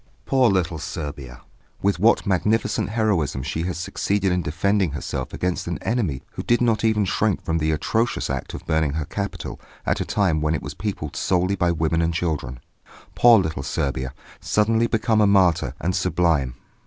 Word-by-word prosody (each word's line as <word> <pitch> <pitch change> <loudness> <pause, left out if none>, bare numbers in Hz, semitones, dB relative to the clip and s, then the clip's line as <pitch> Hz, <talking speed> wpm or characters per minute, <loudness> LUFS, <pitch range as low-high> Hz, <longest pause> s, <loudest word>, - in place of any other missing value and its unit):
Poor 130 -3 +4
little 90 -4 0
Serbia! 70 -6 -6 0.4
With 100 -3 +2
what 115 +5 +4
magnificent 105 +4 +1
heroism 95 - 0
she 80 +3 -3
has 90 - -3
succeeded 95 +2 -1
in 90 0 +1
defending 90 +1 0
herself 70 -1 -4
against 90 0 -2
an 85 - -2
enemy 95 - -1
who - - -5
did 120 - +2
not 115 -3 +1
even 110 -2 +2
shrink 105 +1 0
from 80 0 0
the 80 0 0
atrocious 110 +10 0
act 65 -1 -4
of - - -9
burning 80 -3 +1
her 80 -1 -2
capital 100 +6 -5 0.2
at - - 0
a - - +1
time 90 -7 +1
when 75 +1 +1
it - - -4
was - - -6
peopled 95 -7 -4
solely 90 +1 +1
by 85 -2 +1
women 80 0 0
and 85 0 0
children! 75 -8 -2 0.5
Poor 120 -1 +7
little 80 -8 -1
Serbia, 65 -1 -2 0.2
suddenly 115 +2 +2
become 110 -1 +2
a 105 - +5
martyr, 90 -9 +3
and 90 +1 -1
sublime! 85 -8 +1
90 Hz, 180 wpm, -23 LUFS, 75-105 Hz, 0.5 s, Poor